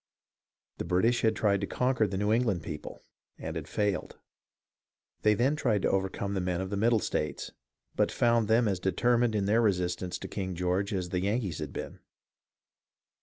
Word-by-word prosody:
The - - -1
British 115 +7 +2
had 110 -1 +2
tried 100 -3 +2
to 100 - -2
conquer 125 -4 +1
the 95 -1 -3
New 105 +2 +1
England 110 -8 +1
people, - - -7 0.3
and - - -6
had - - -5
failed. 105 -3 -1 1.0
They 105 0 +4
then 130 +7 +2
tried 120 -10 +1
to - - +2
overcome 95 +1 -1
the 95 - -1
men 90 -1 -1
of 95 +1 -4
the - - -1
Middle 115 +3 +3
states, - - -2 0.4
but - - +2
found 115 -2 +2
them 115 +1 +4
as 95 -3 0
determined 120 +5 +2
in 100 -2 +1
their 110 +4 +3
resistance 90 -3 0
to - - -7
King 95 -3 -4
George 90 +4 0
as 90 -3 -2
the 90 0 -1
Yankees 100 -3 -1
had 75 -3 -5
been. - - -7
100 Hz, 180 wpm, -29 LUFS, 95-115 Hz, 1.0 s, They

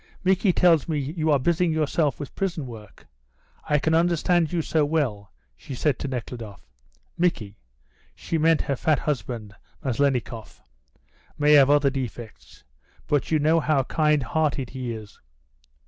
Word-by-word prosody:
"Micky 190 +1 +3
tells 170 -3 +3
me 155 - 0
you 155 +3 -2
are 145 - +5
busying 170 +5 +1
yourself 155 -1 0
with 145 - -7
prison 175 -6 -3
work. 110 -5 -12 0.6
I 150 - +4
can 160 +2 0
understand 170 0 +2
you 170 -2 -1
so 155 0 +1
well," 130 - -1 0.2
she 135 - -9
said 140 +1 0
to - - -4
Nekhludoff. 115 -5 -7 0.5
"Micky 115 - -1 0.6
(she 165 - -3
meant 160 0 +3
her 140 - -1
fat 155 +3 +1
husband, 115 -6 -4 0.3
Maslennikoff) 125 -3 -2 0.7
may 150 0 +4
have 140 -2 +7
other 145 -1 +4
defects, 120 -4 -7 0.4
but 145 -2 0
you 160 - +3
know 155 +2 +3
how 150 -3 +1
kind 150 0 +1
hearted 140 -1 -1
he 130 -2 -5
is. 110 -2 -9
145 Hz, 145 wpm, -24 LUFS, 125-160 Hz, 0.7 s, have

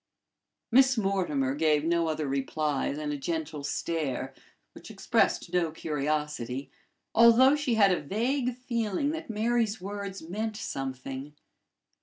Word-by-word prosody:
Miss 260 +1 +5
Mortimer 180 -10 0
gave 150 0 +2
no 170 0 +2
other 155 -2 -2
reply 140 +2 -1
than 150 +1 -3
a 145 - -2
gentle 155 0 -3
stare, 145 -2 -2 0.4
which - - -12
expressed 170 - 0
no 175 -2 +2
curiosity, 150 -4 -3 0.4
although 235 +5 +7
she 290 -5 0
had 200 -3 +5
a 180 - +1
vague 245 - -1
feeling 235 +1 -1
that 320 -2 -6
Mary's 225 0 0
words 200 0 -6
meant 210 +6 -4
something. 135 - -5
170 Hz, 125 wpm, -28 LUFS, 150-225 Hz, 0.4 s, although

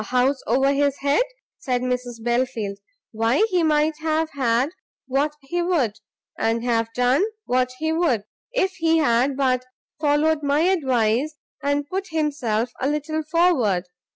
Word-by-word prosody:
"A - - -5
house 255 +4 +1
over 270 +4 +3
his 280 0 +1
head?" 285 - +3 0.4
said 250 -2 -1
Mrs 250 -2 -3
Belfield, 235 -4 -1 0.3
"why 225 - +2
he 360 -1 +3
might 305 -1 +2
have 315 0 0
had 260 0 +1 0.3
what 280 +3 0
he 345 +6 -2
would, 280 - 0 0.4
and 225 +1 0
have 230 -2 0
done 250 +7 +3 0.2
what 255 0 +1
he 315 +2 -1
would, 320 - +1 0.3
if 385 -7 +1
he 330 -1 +3
had 260 -2 +2
but 255 -2 +1 0.4
followed 300 +1 +2
my 285 +1 +2
advice, 270 - +1 0.3
and 285 +1 0
put 385 +3 -3
himself 280 - -1
a 265 - +1
little 300 +1 -2
forward. 305 - +2
275 Hz, 150 wpm, -23 LUFS, 245-310 Hz, 0.4 s, over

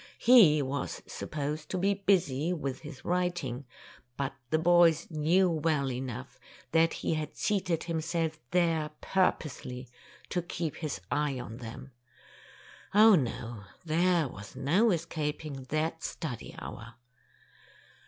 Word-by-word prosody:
He 185 - +7
was 140 +1 -3
supposed 150 +1 -4
to 185 - -2
be 195 +2 +2
busy 180 -6 +1
with 140 -6 -3
his 150 -4 -10
writing, 175 -8 -1 0.5
but 135 -1 -2 0.2
the 155 - +3
boys 170 -1 +5
knew 165 +5 +3
well 155 -5 +1
enough 125 0 -6 0.3
that 165 0 +4
he - - +2
had 155 -1 -4
seated 185 -6 0
himself 160 -1 -2
there 165 -4 +2
purposely 135 -8 -1 0.4
to 180 - 0
keep 170 -2 -4
his 155 - -4
eye 145 -3 0
on 115 -2 -7
them. 120 +3 -9 1.0
Oh, 215 +1 +8
no, 120 - -1 0.2
there 170 0 +2
was 100 -3 -10
no 170 - +3
escaping 155 -5 -3
that 160 +2 -1
study 135 -8 -5
hour! 115 +1 -8
155 Hz, 125 wpm, -30 LUFS, 135-175 Hz, 1.0 s, Oh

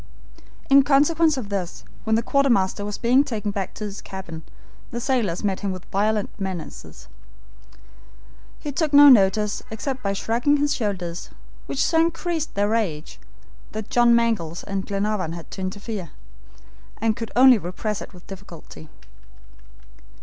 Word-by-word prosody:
In 275 0 +7
consequence 300 +3 +3
of 225 -6 -5
this, 175 - -4 0.2
when 220 - +2
the 230 - +1
quartermaster 235 -8 +2
was 205 0 -4
being 250 +4 +4
taken 215 -6 -3
back 195 -2 -4
to 215 - -7
his 205 -1 -6
cabin, 185 -4 -8 0.5
the 235 - -4
sailors 230 -9 -1
met 195 -2 0
him 200 -2 -2
with 185 -1 -7
violent 210 +1 0
menaces. 180 -7 -7 1.5
He 295 - -5
took 300 +1 -1
no 290 0 +10
notice 210 -3 +4
except 255 +4 -4
by 200 -3 -1
shrugging 235 +8 +1
his 290 0 +1
shoulders, 180 -6 -3 0.4
which 270 - 0
so 325 - +2
increased 330 -1 -2
their 205 +1 +1
rage, 185 -9 -2 0.5
that 215 -1 -6
John 240 -1 +5
Mangles 215 -9 0
and 195 -1 -4
Glenarvan 200 -4 -1
had 170 -1 -10
to 190 - -7
interfere, 190 -1 -5 0.9
and 220 0 +1
could 230 -2 -5
only 255 -2 +7
repress 195 +4 -4
it - - -9
with 180 -2 -15
difficulty. 165 - -11
210 Hz, 150 wpm, -23 LUFS, 190-255 Hz, 1.5 s, no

